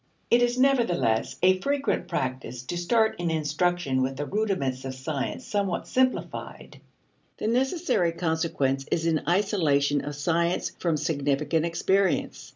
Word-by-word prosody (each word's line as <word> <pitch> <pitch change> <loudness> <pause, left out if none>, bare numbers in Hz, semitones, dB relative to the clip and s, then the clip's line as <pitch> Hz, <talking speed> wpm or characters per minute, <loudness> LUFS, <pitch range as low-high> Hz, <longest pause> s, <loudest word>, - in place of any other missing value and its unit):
It 240 - +5
is, 245 0 +2
nevertheless, 235 - +2
a 185 0 +5
frequent 280 +2 0
practice 130 -1 -3
to 130 - -5
start 220 +6 +1
in 175 -1 -1
instruction 155 -2 0
with 130 +1 -1
the 145 - -2
rudiments 165 -11 -1
of 130 0 -5
science 135 +1 -4
somewhat 200 -4 -1
simplified. 255 0 -2 0.6
The - - -5
necessary 255 - +1
consequence 160 -5 -1
is 165 - 0
an 160 -2 +1
isolation 155 -7 +2
of 145 0 -5
science 170 +4 0
from 165 -3 0
significant 150 +1 0
experience. 185 -5 0
165 Hz, 135 wpm, -26 LUFS, 140-200 Hz, 0.6 s, It